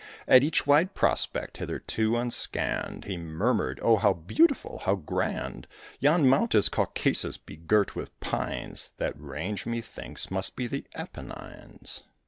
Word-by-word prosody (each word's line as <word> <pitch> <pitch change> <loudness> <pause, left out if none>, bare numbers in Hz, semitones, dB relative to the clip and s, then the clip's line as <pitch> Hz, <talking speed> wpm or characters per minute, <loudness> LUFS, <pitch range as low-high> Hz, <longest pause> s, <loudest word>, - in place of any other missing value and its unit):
At 130 - +8
each 150 +3 +2
wide 155 +7 +4
prospect, - - +1
hitherto 110 +1 -1
unscanned, 120 0 -1
He 95 -3 -4
murmured, 80 -5 -1
"Oh, 115 -1 +5
how 100 -1 +3
beautiful! 280 - +1
how 95 - +2
grand! 90 -7 -3 0.3
Yon 145 +1 +4
mount 140 - +3
is 105 - +6
Caucasus, - - +1
begirt 90 +6 0
with - - -7
pines; - - -3
That - - -2
range, 75 +9 -5
methinks, 115 -4 -5
must 95 0 0
be 125 - -3
the 120 - -4
Apennines." - - -9
110 Hz, 130 wpm, -28 LUFS, 90-135 Hz, 0.3 s, At